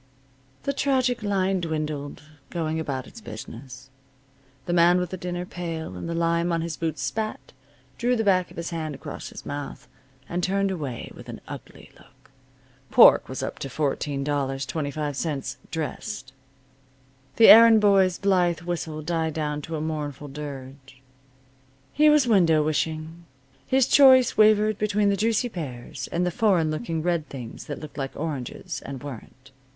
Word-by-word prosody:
The 280 Hz, -, -1 dB
tragic 260 Hz, -3 st, +1 dB
line 195 Hz, -2 st, 0 dB
dwindled, 155 Hz, -3 st, -4 dB, 0.3 s
going 160 Hz, -2 st, -2 dB
about 135 Hz, -5 st, -3 dB
its 230 Hz, -, -13 dB
business. 125 Hz, -, -10 dB, 0.7 s
The 175 Hz, -, -2 dB
man 175 Hz, +1 st, +5 dB
with 180 Hz, -1 st, -2 dB
the -, -, -3 dB
dinner 180 Hz, 0 st, -4 dB
pail 165 Hz, -, -5 dB
and 90 Hz, -, -6 dB
the 170 Hz, -, -2 dB
lime 170 Hz, +1 st, +1 dB
on 165 Hz, -1 st, 0 dB
his 165 Hz, -1 st, -4 dB
boots 160 Hz, -4 st, -3 dB
spat, 215 Hz, +11 st, -4 dB, 0.5 s
drew 245 Hz, +1 st, +2 dB
the 225 Hz, -, 0 dB
back 185 Hz, -3 st, +2 dB
of -, -, -15 dB
his 170 Hz, +1 st, -4 dB
hand 155 Hz, -3 st, -4 dB
across 145 Hz, +2 st, -8 dB
his -, -, -11 dB
mouth, 145 Hz, -2 st, -6 dB, 0.4 s
and 175 Hz, +1 st, -2 dB
turned 195 Hz, +2 st, +1 dB
away 145 Hz, -10 st, -5 dB
with -, -, -12 dB
an -, -, -7 dB
ugly -, -, -10 dB
look. -, -, -23 dB, 0.6 s
(Pork -, -, +7 dB
was -, -, -4 dB
up -, -, -5 dB
to -, -, -4 dB
$14.25, 140 Hz, +1 st, -2 dB
dressed.) 160 Hz, -, -5 dB, 1.0 s
The 225 Hz, -, +7 dB
errand 225 Hz, 0 st, +9 dB
boy's 195 Hz, -3 st, +4 dB
blithe 180 Hz, -4 st, +2 dB
whistle 165 Hz, -3 st, -4 dB
died 160 Hz, -1 st, -1 dB
down 150 Hz, -1 st, -2 dB
to 160 Hz, +2 st, -5 dB
a 150 Hz, -, -3 dB
mournful 150 Hz, -2 st, -4 dB
dirge. 135 Hz, -2 st, -9 dB, 0.9 s
He 305 Hz, 0 st, +5 dB
was 300 Hz, -3 st, +5 dB
window 170 Hz, -8 st, +4 dB
wishing. 160 Hz, +2 st, -2 dB, 0.4 s
His 265 Hz, -1 st, +3 dB
choice 260 Hz, -3 st, +6 dB
wavered 215 Hz, -1 st, +4 dB
between 210 Hz, -1 st, +2 dB
the 200 Hz, -, +2 dB
juicy 225 Hz, +4 st, +1 dB
pears, 130 Hz, -, -7 dB
and 175 Hz, +1 st, 0 dB
the 180 Hz, -, 0 dB
foreign 175 Hz, -5 st, +2 dB
looking 160 Hz, -1 st, -3 dB
red 170 Hz, -3 st, -1 dB
things 125 Hz, -4 st, -8 dB
that 145 Hz, -, -5 dB
looked 155 Hz, -1 st, -9 dB
like 135 Hz, -1 st, -4 dB
oranges, 145 Hz, -6 st, -5 dB
and 135 Hz, 0 st, -7 dB
weren't. 130 Hz, 0 st, -10 dB
165 Hz, 155 wpm, -25 LUFS, 145-195 Hz, 1.0 s, errand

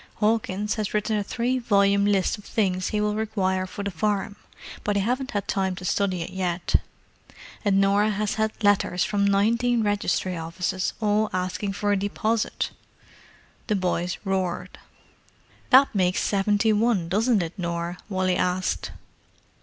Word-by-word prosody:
Hawkins 210 Hz, -1 st, 0 dB
has 215 Hz, -1 st, -2 dB
written 210 Hz, +1 st, 0 dB
a 205 Hz, -, 0 dB
three 245 Hz, +5 st, -1 dB
volume 200 Hz, -3 st, +3 dB
list 195 Hz, -3 st, +2 dB
of -, -, -13 dB
things 185 Hz, -4 st, 0 dB
he 210 Hz, -, -1 dB
will 210 Hz, 0 st, +1 dB
require 190 Hz, -4 st, -1 dB
for 200 Hz, +2 st, -6 dB
the 200 Hz, -, -2 dB
farm, 200 Hz, +3 st, -1 dB, 0.5 s
but 205 Hz, -1 st, 0 dB
I -, -, +2 dB
haven't 255 Hz, +5 st, -1 dB
had 200 Hz, -2 st, -3 dB
time 190 Hz, -1 st, 0 dB
to 180 Hz, -, -8 dB
study 185 Hz, -2 st, 0 dB
it 165 Hz, -, -8 dB
yet. 180 Hz, -2 st, 0 dB, 0.9 s
And 200 Hz, -3 st, +3 dB
Norah 200 Hz, +2 st, +3 dB
has 210 Hz, 0 st, -1 dB
had 220 Hz, +1 st, -2 dB
letters 200 Hz, -3 st, +3 dB
from 205 Hz, -1 st, 0 dB
nineteen 230 Hz, +4 st, +2 dB
registry 205 Hz, -3 st, 0 dB
offices, 175 Hz, +3 st, -2 dB
all 210 Hz, 0 st, +2 dB
asking 185 Hz, +2 st, -2 dB
for 205 Hz, +1 st, -1 dB
a 205 Hz, -, +3 dB
deposit!" 215 Hz, +3 st, -1 dB, 1.0 s
The 215 Hz, -, +1 dB
boys 180 Hz, -2 st, -1 dB
roared. 190 Hz, -2 st, -2 dB, 0.9 s
"That 270 Hz, +2 st, +6 dB
makes 185 Hz, -2 st, +1 dB
seventy 205 Hz, +2 st, +2 dB
one, 210 Hz, -5 st, +1 dB
doesn't 210 Hz, +2 st, +2 dB
it, 165 Hz, +1 st, -5 dB
Nor?" 170 Hz, -1 st, -3 dB
Wally 185 Hz, -2 st, +1 dB
asked. 180 Hz, +1 st, -1 dB
200 Hz, 155 wpm, -25 LUFS, 185-215 Hz, 1.0 s, That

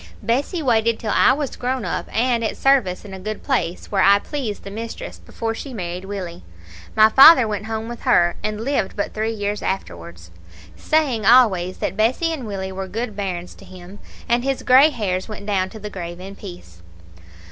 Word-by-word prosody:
Bessie 285 Hz, +8 st, -1 dB
waited 230 Hz, -3 st, +2 dB
till 215 Hz, -2 st, -4 dB
I -, -, +5 dB
was 285 Hz, -1 st, -4 dB
grown 255 Hz, -1 st, -3 dB
up -, -, -3 dB
and 235 Hz, 0 st, +1 dB
at 220 Hz, -, -2 dB
service 250 Hz, -10 st, +2 dB
in 195 Hz, -, -9 dB
a 190 Hz, -, -7 dB
good 215 Hz, +2 st, -6 dB
place, 235 Hz, -, -2 dB
where 195 Hz, -2 st, +2 dB
I 200 Hz, +1 st, +6 dB
pleased 230 Hz, -2 st, -5 dB
the 195 Hz, -, -8 dB
mistress, 225 Hz, +2 st, -7 dB
before 225 Hz, 0 st, -4 dB
she 260 Hz, +3 st, -8 dB
married 180 Hz, -1 st, -5 dB
Willie. 185 Hz, -4 st, -6 dB, 0.5 s
My 215 Hz, 0 st, +7 dB
father 265 Hz, +2 st, +8 dB
went 210 Hz, -1 st, -4 dB
home 220 Hz, 0 st, -4 dB
with 240 Hz, 0 st, -8 dB
her, 175 Hz, -9 st, +3 dB
and 215 Hz, 0 st, -3 dB
lived 270 Hz, -8 st, -1 dB
but 200 Hz, -, -3 dB
three 220 Hz, +1 st, -1 dB
years 205 Hz, -1 st, -3 dB
afterwards, 85 Hz, -, -6 dB, 0.4 s
saying 285 Hz, -8 st, 0 dB
always 195 Hz, -6 st, +4 dB
that -, -, -3 dB
Bessie 260 Hz, +10 st, +1 dB
and 265 Hz, -8 st, -6 dB
Willie 190 Hz, -2 st, -5 dB
were 190 Hz, 0 st, -5 dB
good 220 Hz, +3 st, -4 dB
bairns 180 Hz, -3 st, -4 dB
to -, -, -16 dB
him, 185 Hz, +2 st, -12 dB, 0.3 s
and 240 Hz, +1 st, +1 dB
his 270 Hz, 0 st, -2 dB
grey 265 Hz, +4 st, +6 dB
hairs 205 Hz, -8 st, -3 dB
went 210 Hz, -1 st, -8 dB
down 190 Hz, -2 st, 0 dB
to 220 Hz, -, -11 dB
the 210 Hz, 0 st, -7 dB
grave 175 Hz, -2 st, -7 dB
in 195 Hz, +2 st, -9 dB
peace. 175 Hz, -, -12 dB
215 Hz, 195 wpm, -21 LUFS, 190-245 Hz, 0.5 s, father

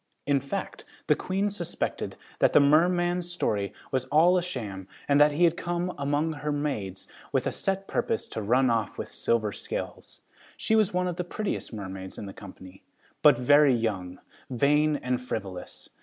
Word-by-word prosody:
In 140 Hz, -1 st, +3 dB
fact, 140 Hz, 0 st, -5 dB, 0.2 s
the -, -, +4 dB
Queen 195 Hz, +2 st, -1 dB
suspected 175 Hz, -4 st, -3 dB, 0.2 s
that -, -, +4 dB
the -, -, +8 dB
merman's 175 Hz, +4 st, +3 dB
story 100 Hz, -, -1 dB, 0.2 s
was 130 Hz, -2 st, 0 dB
all 160 Hz, +6 st, +4 dB
a 180 Hz, -, +3 dB
sham 105 Hz, -, -5 dB, 0.2 s
and 145 Hz, 0 st, +4 dB
that 150 Hz, 0 st, +6 dB
he 165 Hz, +4 st, +1 dB
had 170 Hz, -1 st, +4 dB
come 175 Hz, +1 st, -2 dB
among 145 Hz, +3 st, 0 dB
her 150 Hz, 0 st, -3 dB
maids 135 Hz, -11 st, -3 dB, 0.2 s
with -, -, +1 dB
a -, -, 0 dB
set 195 Hz, 0 st, -2 dB
purpose 225 Hz, -, -1 dB
to 110 Hz, -, -4 dB
run 125 Hz, +4 st, +3 dB
off 115 Hz, -3 st, -1 dB
with -, -, -6 dB
Silver 110 Hz, -3 st, 0 dB
Scales. -, -, -6 dB, 0.4 s
She 220 Hz, -, +1 dB
was 215 Hz, -2 st, +3 dB
one 180 Hz, 0 st, 0 dB
of 175 Hz, -1 st, -3 dB
the 180 Hz, -, -1 dB
prettiest 205 Hz, +4 st, -4 dB
mermaids 95 Hz, -3 st, -7 dB
in -, -, -6 dB
the 100 Hz, -, -8 dB
company, 95 Hz, -1 st, -12 dB, 0.4 s
but 145 Hz, -4 st, +7 dB
very 145 Hz, +2 st, +5 dB
young, 95 Hz, -6 st, -2 dB, 0.3 s
vain 150 Hz, +4 st, +3 dB
and 125 Hz, -2 st, -2 dB
frivolous. 100 Hz, -7 st, -6 dB
145 Hz, 175 wpm, -27 LUFS, 110-175 Hz, 0.4 s, the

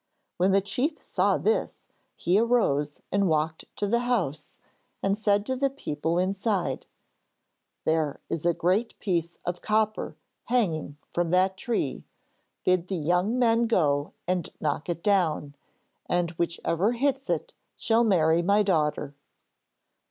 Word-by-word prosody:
When 185 Hz, +2 st, +3 dB
the 195 Hz, +1 st, +4 dB
chief 260 Hz, -, -1 dB
saw -, -, +1 dB
this 450 Hz, +3 st, 0 dB, 0.3 s
he 180 Hz, +4 st, +2 dB
arose 150 Hz, -, +1 dB
and 200 Hz, -1 st, +2 dB
walked 160 Hz, 0 st, 0 dB
to 205 Hz, -, -1 dB
the 235 Hz, +4 st, +2 dB
house 190 Hz, -, -2 dB, 0.5 s
and 195 Hz, 0 st, +2 dB
said 205 Hz, -1 st, +1 dB
to 260 Hz, -, -1 dB
the 275 Hz, +2 st, +1 dB
people 165 Hz, -, -2 dB
inside: 195 Hz, +1 st, -1 dB, 1.0 s
'There 155 Hz, -3 st, +1 dB
is 160 Hz, -, -3 dB
a 175 Hz, -, +4 dB
great 190 Hz, +7 st, 0 dB
piece 170 Hz, -4 st, -1 dB
of 175 Hz, 0 st, -3 dB
copper 215 Hz, 0 st, 0 dB, 0.3 s
hanging 165 Hz, -, 0 dB, 0.2 s
from 175 Hz, -1 st, 0 dB
that 185 Hz, +2 st, +3 dB
tree. 190 Hz, -, -2 dB, 0.6 s
Bid 185 Hz, -1 st, +2 dB
the 190 Hz, -, -2 dB
young 180 Hz, +8 st, +1 dB
men 235 Hz, -1 st, +3 dB
go 145 Hz, -9 st, +1 dB
and 180 Hz, -3 st, 0 dB
knock 150 Hz, +2 st, -2 dB
it 170 Hz, -1 st, -3 dB
down 165 Hz, -8 st, +1 dB, 0.5 s
and 175 Hz, -1 st, +1 dB
whichever 170 Hz, +4 st, 0 dB
hits 270 Hz, +2 st, 0 dB
it -, -, -1 dB, 0.2 s
shall 230 Hz, +1 st, +2 dB
marry 170 Hz, -6 st, +3 dB
my 200 Hz, +4 st, +3 dB
daughter.' 150 Hz, -6 st, 0 dB
185 Hz, 135 wpm, -27 LUFS, 160-220 Hz, 1.0 s, the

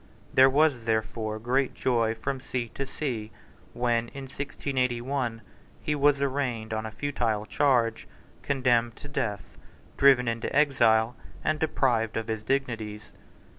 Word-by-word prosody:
There 130 Hz, +1 st, +7 dB
was 140 Hz, -4 st, +2 dB
therefore 110 Hz, -1 st, -1 dB
great 125 Hz, +4 st, 0 dB
joy 115 Hz, -3 st, +1 dB
from 130 Hz, +4 st, -3 dB
sea 125 Hz, -3 st, -3 dB
to 140 Hz, +4 st, -5 dB
sea 120 Hz, -7 st, -4 dB, 0.4 s
when, 120 Hz, -1 st, 0 dB
in 135 Hz, +3 st, -8 dB
1681, 130 Hz, -3 st, -2 dB, 0.4 s
he 150 Hz, -, -1 dB
was 145 Hz, -1 st, +3 dB
arraigned 130 Hz, -5 st, -1 dB
on 110 Hz, 0 st, -2 dB
a -, -, -8 dB
futile 115 Hz, -5 st, -1 dB
charge, 120 Hz, -4 st, +1 dB, 0.3 s
condemned 120 Hz, -2 st, +1 dB
to 145 Hz, -, -11 dB
death, 110 Hz, -10 st, -4 dB, 0.4 s
driven 135 Hz, -3 st, +5 dB
into 115 Hz, 0 st, -2 dB
exile, 120 Hz, -5 st, +4 dB, 0.3 s
and 155 Hz, -1 st, 0 dB
deprived 120 Hz, -8 st, +1 dB
of 110 Hz, 0 st, -3 dB
his 110 Hz, -1 st, -2 dB
dignities. 110 Hz, -4 st, -3 dB
120 Hz, 130 wpm, -27 LUFS, 110-135 Hz, 0.4 s, There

